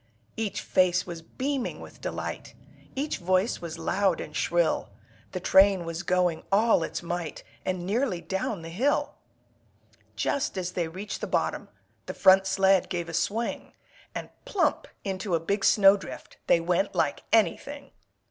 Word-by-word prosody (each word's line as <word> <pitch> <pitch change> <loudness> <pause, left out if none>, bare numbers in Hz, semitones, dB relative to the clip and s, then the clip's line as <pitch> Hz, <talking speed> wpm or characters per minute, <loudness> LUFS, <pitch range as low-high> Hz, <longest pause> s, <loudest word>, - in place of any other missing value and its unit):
Each 220 -2 -2
face 180 -1 +2
was 170 -2 -7
beaming 265 - -3
with - - -12
delight, - - -5 0.4
Each 290 +3 -2
voice 185 +5 +1
was 170 -1 -6
loud 180 +2 +1
and 150 - -7
shrill, 175 -1 +1 0.4
The 185 - -3
train 190 -1 +5
was 165 0 -4
going 180 -3 +1
all 215 0 +4
its 165 - -4
might 170 -2 -4 0.2
And 185 -1 -2
nearly 210 -1 0
down 190 +1 -3
the 165 - -7
hill. 255 +12 +1 1.0
Just 275 -8 -1
as 180 -1 -2
they 175 -2 -1
reached 190 +6 -6
the - - -2
bottom, - - -1 0.4
The - - -5
front 190 0 +6
sled 190 0 +3
gave 175 -2 -3
a - - -7
swing, 225 +8 -2 0.4
And - - -5
plump 465 -6 0 0.2
into 190 -2 -1
a - - +1
big 195 +5 -1
snowdrift 195 -1 +3
They - - +5
went 180 +3 0
like 155 -4 +1
anything! 275 - +1
185 Hz, 150 wpm, -27 LUFS, 170-205 Hz, 1.0 s, front